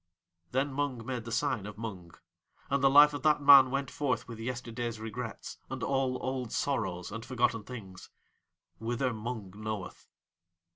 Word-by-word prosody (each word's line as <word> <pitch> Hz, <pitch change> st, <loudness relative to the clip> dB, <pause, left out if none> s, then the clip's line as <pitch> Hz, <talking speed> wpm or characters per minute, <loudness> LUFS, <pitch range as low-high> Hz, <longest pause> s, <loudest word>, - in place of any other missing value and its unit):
Then 135 Hz, +4 st, 0 dB
Mung 135 Hz, -5 st, -2 dB
made 125 Hz, -3 st, -4 dB
the 115 Hz, -, -6 dB
sign 105 Hz, -2 st, 0 dB
of 105 Hz, -1 st, -9 dB
Mung. 95 Hz, -7 st, -7 dB, 0.6 s
And 140 Hz, -1 st, +1 dB
the 135 Hz, -, +7 dB
Life 145 Hz, +2 st, +8 dB
of 145 Hz, -, -4 dB
that 150 Hz, 0 st, +4 dB
man 140 Hz, -2 st, +9 dB
went 135 Hz, 0 st, -2 dB
forth 145 Hz, -5 st, -1 dB
with 115 Hz, -2 st, -8 dB
yesterday's 120 Hz, -1 st, -4 dB
regrets 110 Hz, -2 st, -6 dB
and -, -, -5 dB
all 135 Hz, -2 st, +1 dB
old 130 Hz, -3 st, -3 dB
sorrows 95 Hz, -11 st, -1 dB
and 115 Hz, +2 st, -6 dB
forgotten 120 Hz, -3 st, 0 dB
things 100 Hz, -7 st, -10 dB, 0.7 s
whither 120 Hz, +3 st, -1 dB
Mung 110 Hz, -3 st, -5 dB
knoweth. 105 Hz, -2 st, -6 dB
120 Hz, 155 wpm, -31 LUFS, 110-135 Hz, 0.7 s, man